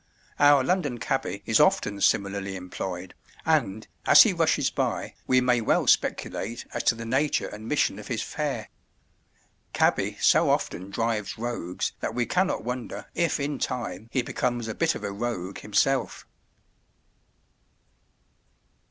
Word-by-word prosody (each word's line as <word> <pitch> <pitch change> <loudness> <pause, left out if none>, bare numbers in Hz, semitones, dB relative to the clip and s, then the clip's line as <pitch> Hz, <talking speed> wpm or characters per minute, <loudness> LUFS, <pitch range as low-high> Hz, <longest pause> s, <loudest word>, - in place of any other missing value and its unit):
Our 145 -2 +6
London 150 -6 0
cabby 110 - -2
is - - +3
often 100 -1 +2
similarly 100 -1 +1
employed, 90 0 -6 0.3
and, 100 +3 +1 0.2
as - - +10
he - - +1
rushes - - +1
by, - - -2
we 130 0 +4
may 125 -1 +2
well 110 - +2
speculate 115 +4 0
as - - -1
to - - +4
the 115 0 -7
nature 135 +6 +1
and 110 +1 -9
mission 140 -8 +1
of 105 - -9
his 115 -3 -2
fare. 145 -8 -3 1.0
Cabby - - +1
so - - +4
often 95 +3 -1
drives 110 +1 -2
rogues 115 -7 -3
that - - -3
we 120 -1 +1
cannot 185 +7 0
wonder 125 +1 -5
if 170 -3 0
in 140 0 -2
time 115 -4 -4
he 130 - 0
becomes 120 -1 -2
a 110 - -3
bit 165 +5 +1
of - - -7
a 100 - -3
rogue 100 -3 -4
himself. 125 +6 0
115 Hz, 145 wpm, -26 LUFS, 100-130 Hz, 1.0 s, as